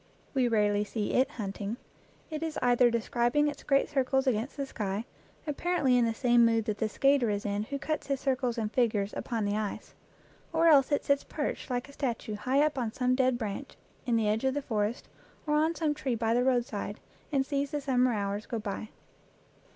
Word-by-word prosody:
We 260 -3 +2
rarely 210 -2 +2
see 210 0 -3
it 260 - +3
hunting; 205 0 -5 0.5
it 310 -1 -4
is 320 -2 -3
either 245 0 +5
describing 240 +5 +1
its 290 - -4
great 275 -1 +2
circles 265 -1 +1
against 250 +2 -1
the 280 - -2
sky, 210 -3 -3 0.4
apparently 300 -3 +1
in 245 -1 +4
the 225 - 0
same 240 -1 +4
mood 225 -1 +3
that 210 -2 -2
the 220 - 0
skater 275 0 +3
is 205 0 -2
in 205 +1 -1
who 280 +4 -4
cuts 310 +2 -3
his 275 -1 -1
circles 255 -3 0
and 215 -2 -2
figures 215 -5 +1
upon 225 -3 -2
the 205 0 0
ice; 215 -1 -4 0.6
or 330 +1 +4
else 280 -2 +5
it 285 - +1
sits 280 0 +2
perched 295 -2 -4
like 245 +1 -2
a 280 - -14
statue 235 -6 -3
high 260 +7 +2
up 300 -3 -1
on 230 -3 -1
some 250 +2 +1
dead 255 -1 +2
branch 210 -4 -5 0.3
in 240 - +2
the 225 -2 +2
edge 215 +3 +1
of 265 0 +1
the 290 - -2
forest, 215 -1 -2 0.4
or 300 - 0
on 315 +2 +2
some 315 -3 0
tree 265 -4 -2
by 225 0 0
the 245 +1 +3
roadside, 235 -5 -1 0.3
and 270 -2 +2
sees 280 0 -1
the 295 - -2
sum 265 -3 +1
mer 255 0 +4
hours 205 0 -2
go 235 - -3
by. 215 0 -5
245 Hz, 210 wpm, -29 LUFS, 215-275 Hz, 0.6 s, either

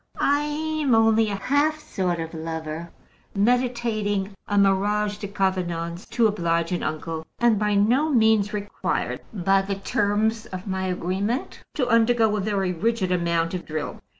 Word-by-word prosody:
I'm 295 -1 +1
only 225 -1 +4
a 200 - -2
half 285 +9 +1
sort 180 - -2
of 165 0 -5
lover, 160 0 -5 0.5
meditating 215 -3 0 0.2
a 205 - 0
mariage 205 +1 +2
de 205 - -4
convenance 180 -3 -2
to 235 - +2
oblige 170 -5 +1
an 180 - -1
uncle, 160 +1 -3
and 235 -3 +3
by 210 -1 +1
no 245 +10 +3
means 220 -6 +3
required 205 -1 -3
by 195 -1 +2
the 195 +1 -3
terms 210 +3 0
of 185 0 -7
my 190 -1 -2
agreement 190 - -2 0.2
to 255 -4 0
undergo 230 -2 +3
a - - -1
very 195 -2 0
rigid 195 +1 0
amount 170 -1 0
of 180 - -3
drill. 155 -1 -5
205 Hz, 150 wpm, -24 LUFS, 180-225 Hz, 0.5 s, only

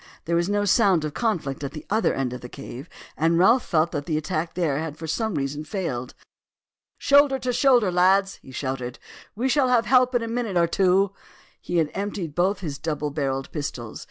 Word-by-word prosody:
There 170 - 0
was 170 +2 +1
no 205 0 +1
sound 195 -6 +3
of 150 - -4
conflict 165 - -2
at 140 - -4
the 155 - -8
other 220 +2 +2
end 130 -2 -2
of 125 - -7
the 125 - -9
cave, 135 +2 -9 0.3
and 165 +2 +2
Ralph 225 +8 +5
felt 160 +1 +1
that 145 -2 -4
the 155 -3 0
attack 155 +1 -3
there 160 -6 0
had 155 -1 -5
for 160 - -7
some 220 +5 -2
reason 145 +1 -3
failed. 150 - -4 0.8
"Shoulder 280 -1 +4
to 250 -1 -2
shoulder, 245 -5 +4
lads!" 190 +2 +3
he - - -15
shouted. 130 -2 -4 0.4
"We 240 +5 0
shall 265 0 +3
have 245 -2 +3
help 255 0 +4
in 240 - +2
a - - -3
minute 230 -5 -2
or 170 - +4
two." 190 +2 +2 0.5
He 175 - -2
had 160 -3 +1
emptied 195 -5 -4
both 185 +5 +1
his 145 -5 -5
double 150 -2 -3
barrelled 135 -2 -2
pistols. 125 -7 -5
170 Hz, 205 wpm, -24 LUFS, 145-210 Hz, 0.8 s, Ralph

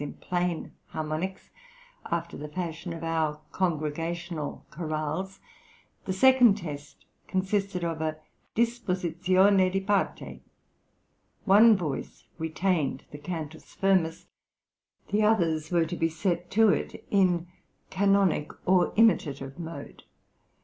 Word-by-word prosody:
in 145 - -5
plain 180 -2 -2 0.2
harmonics, 155 +5 -4 0.6
after 170 0 -2
the 150 - -6
fashion 170 +1 -5
of 165 0 -6
our 160 -2 0
congregational 165 -1 -3
chorales. 155 +4 -3 0.7
The 190 - -1
second 245 0 +6
test 145 -6 -8 0.2
consisted 190 -1 -1
of 165 -2 -2
a 155 -1 -2 0.4
disposizione 190 -4 +2
di 195 - +1
parte. 195 0 -1 1.0
One 215 +3 +7
voice 150 -7 -5
retained 160 -3 -1
the 145 - -9
Cantus 160 -1 -7
firmus, 185 -5 +1 0.8
the 210 - +2
others 165 -8 +2
were 170 -2 +2
to 170 +2 -4
be 165 -1 +1
set 175 +1 -2
to 220 +1 +5
it - - -2
in 180 -4 +3 0.5
canonic 195 -6 +2 0.2
or 185 -1 +3
imitative 150 -10 +2
mode. 165 0 -8
175 Hz, 110 wpm, -28 LUFS, 160-195 Hz, 1.0 s, One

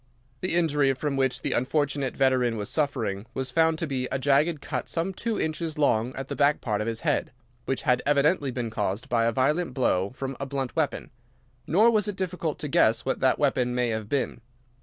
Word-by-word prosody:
"The 185 +2 -1
injury 150 -5 +3
from 140 +1 -2
which 135 -1 0
the - - -1
unfortunate 140 0 0
veteran 130 -4 +2
was 105 -1 -4
suffering 115 -9 -1
was 130 -1 -3
found 160 +3 +3
to 165 - -2
be 130 -4 -2
a - - 0
jagged 145 +4 +2
cut 130 -3 -4
some 175 +3 -1
two 225 +3 -2
inches 160 0 -2
long 125 -4 +1
at 135 0 -5
the - - -4
back 145 +1 +3
part 105 -5 -1
of 105 - -3
his 115 -1 -3
head, - - 0 0.3
which 135 - -2
had 125 -1 +2
evidently 145 +1 +2
been 120 -3 -3
caused 105 0 -2
by 115 -1 +2
a 115 - +2
violent 135 +4 0
blow 95 -7 +1
from 135 0 -4
a 140 - -4
blunt 135 -2 -3
weapon. 155 -1 -1 0.6
Nor 210 +9 +5
was 215 -2 +2
it 205 - -3
difficult 180 -5 -3
to 150 - -5
guess 115 -4 +3
what 135 - -1
that 130 - +3
weapon 125 -4 +1
may 125 -1 +1
have 110 -2 -3
been. 135 -4 -1
135 Hz, 210 wpm, -26 LUFS, 125-155 Hz, 0.6 s, Nor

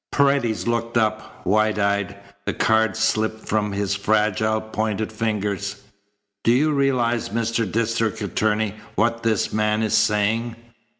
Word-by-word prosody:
Paredes 140 -6 +2
looked 115 0 -1
up, 110 -1 -1
wide 110 +3 +2
eyed. 100 -1 0 0.3
The - - -1
cards 110 +1 +2
slipped 110 0 0
from 105 -1 0
his 100 0 -1
fragile, 110 +1 +1
pointed 110 0 -3
fingers. 105 -2 -2 0.6
"Do 115 - +4
you 145 +6 +3
realize, 130 -5 +1
Mr. 115 -1 -1
District 115 0 0
Attorney, 105 +1 0 0.2
what 115 +2 +1
this 110 -3 0
man 105 +1 +1
is 110 - -1
saying?" 110 +2 +1
110 Hz, 130 wpm, -22 LUFS, 105-115 Hz, 0.6 s, Do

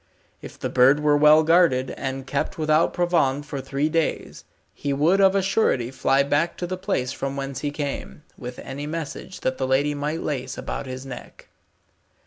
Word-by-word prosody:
If - - -10
the - - -3
bird 135 +4 +4
were 150 -1 +4
well 150 +1 +6
guarded, 160 -6 +3
and 135 0 -5
kept 140 +7 -2
without 155 +1 +2
provand 155 -6 +1
for 140 -2 -5
three 140 +3 -1
days, 160 0 -2 0.3
he 140 -1 -3
would 165 +8 +3
of 195 0 +5
a 195 - +2
surety 160 - +1
fly 135 +1 +2
back 145 +4 0
to 175 - -3
the 185 +1 -3
place 185 -9 -2
from 135 0 -4
whence 135 -1 -4
he 145 - -2
came, 145 +1 -5
with 125 -1 -8
any 140 +2 -6
message 165 +3 -6
that 130 0 -1
the 130 - 0
lady 140 +3 +2
might 150 +3 -3
lace 135 -3 -3
about - - -5
his 130 +1 -7
neck. 125 -2 -10
145 Hz, 185 wpm, -24 LUFS, 135-160 Hz, 0.3 s, well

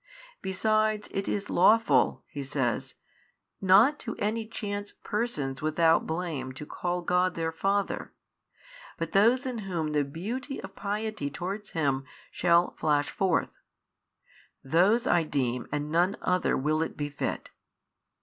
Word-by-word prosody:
Besides 215 +2 +1
it 195 - -2
is 205 0 -2
lawful 225 +6 +4
(He 145 - -7
says) 135 -4 -2 0.7
not 205 +10 +5
to 230 - -5
any 220 +2 -1
chance 205 -2 -5
persons 155 - -2
without 160 +1 +3
blame 160 -6 -3
to 140 +3 -7
call 175 +3 -3
God 180 +1 +2
their 165 -1 -1
Father, 195 +4 -1 0.9
but 165 0 -3
those 235 +7 +4
in 250 -3 -3
whom 170 -6 -2
the 150 -1 +2
beauty 225 - -5
of - - -9
piety 210 -6 -3
towards 190 +7 -5
Him 135 -4 +1 0.3
shall 175 0 +3
flash 145 -2 +1
forth, 190 -4 0 1.0
those 190 - +3
I 175 - +4
deem 125 -6 -1
and 145 +1 -2
none 175 +5 +2
other 180 0 +1
will 155 +4 +1
it 160 - -3
befit. 145 -1 -3
180 Hz, 130 wpm, -28 LUFS, 150-210 Hz, 1.0 s, not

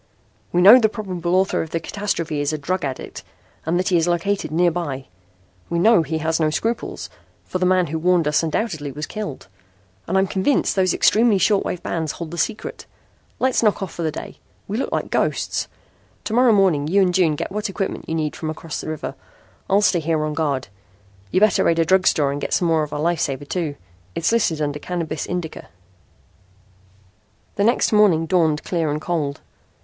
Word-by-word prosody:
"We 175 0 +2
know 220 +7 +10
the 220 -3 +3
probable 185 -5 -3
author 190 +1 +2
of 160 - -5
the 165 - -2
catastrophe 165 -5 -2
is 145 +1 0
a 155 - -2
drug 180 +6 -2
addict 135 -2 -5 0.4
and 170 +2 +1
that 185 - 0
he 180 - +3
is 165 +1 +1
located 185 +3 0
nearby. 165 -5 0 0.6
We 170 - -1
know 215 +2 +5
he 160 0 -2
has 160 +1 -1
no 155 -1 +2
scruples, 225 +9 -3 0.4
for 185 - -3
the 185 - +2
man 185 -1 +3
who 160 0 -3
warned 175 -1 +2
us 150 - +2
undoubtedly 160 -3 -2
was 150 +3 -5
killed. 210 - -6 0.6
And 190 - +1
I'm 190 - +4
convinced 195 +9 +1
those 185 -2 +2
extremely 220 -1 +4
short 200 +1 +2
wave 180 - -4
bands 160 -3 -2
hold 165 -2 -7
the 170 - -5
secret. 215 +7 -3 0.5
Let's 260 -1 +1
knock 210 -3 +2
off 190 - -6
for - - -6
the 160 - 0
day. - - -8 0.3
We 200 - -3
look 270 - -2
like - - -2
ghosts. - - 0 0.6
To 215 - -4
morrow 245 0 +5
morning 185 -8 +3
you 190 +5 +3
and 180 -1 +1
June 175 -5 +3
get - - -4
what 210 +2 -3
equipment 195 0 -4
you 160 - -1
need 155 -2 -2
from 155 - -4
across 155 0 -5
the - - -6
river. 155 -1 -4 0.6
I'll 200 +2 +4
stay 185 -4 +3
here 155 -1 0
on 155 - -3
guard. 145 -4 -1 0.6
You'd 185 - +1
better 215 -1 +4
raid 165 - +2
a 165 - +3
drug 190 +2 +3
store 145 -2 +3
and 145 +1 -4
get - - -3
some 175 - +1
more 160 -1 +2
of 150 -1 -4
our 145 - -3
life 170 +2 +1
saver, 140 0 -2
too. 155 -2 -3 0.4
It's 165 - +1
listed 170 -10 +1
under 145 0 -2
Cannabis 165 -2 -4
Indica." 175 -3 -5 1.9
The 200 - +1
next 235 -1 +2
morning 195 -7 +4
dawned 160 -4 +1
clear 165 -4 -1
and 150 +1 -1
cold. 155 -4 -2
170 Hz, 205 wpm, -21 LUFS, 155-190 Hz, 1.9 s, know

